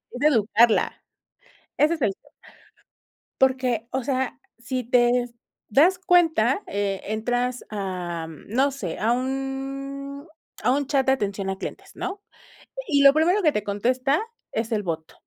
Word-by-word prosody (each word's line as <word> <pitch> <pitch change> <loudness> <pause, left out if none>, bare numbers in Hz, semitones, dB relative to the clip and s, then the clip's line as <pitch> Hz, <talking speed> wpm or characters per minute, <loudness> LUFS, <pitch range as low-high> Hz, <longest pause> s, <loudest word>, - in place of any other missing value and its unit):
es 245 - -8
educarla. 230 -5 +3 0.8
Ese 305 +3 +4
es 315 - -12
el 200 - +2
te - - -29 1.2
Porque, 255 -4 +2
o 265 -1 -2
sea, 260 -1 -1 0.2
si 250 +2 -3
te 240 0 +4 0.6
das 340 - +4
cuenta, 350 - +3
eh, 200 -1 -1
entras 245 +3 -1
a, 180 -5 -4
mm, 160 - -12
no 270 +3 +3
sé, 205 -12 -5
a 220 - +2
un 275 +3 -4 0.3
a - - +3
un 280 +2 +1
chat 275 -1 +2
de - - +4
atención 200 -6 -2
a 190 - -4
clientes, - - -7
¿no? 385 +3 -5 0.7
Y 285 -3 +3
y - - +5
lo 275 0 +9
primero 345 +7 +3
que 310 -5 +3
te 210 - -1
contesta 255 +8 +1 0.3
es 225 +1 -2
el 210 -1 0
bot. 160 -3 -4
255 Hz, 155 wpm, -24 LUFS, 215-280 Hz, 1.2 s, lo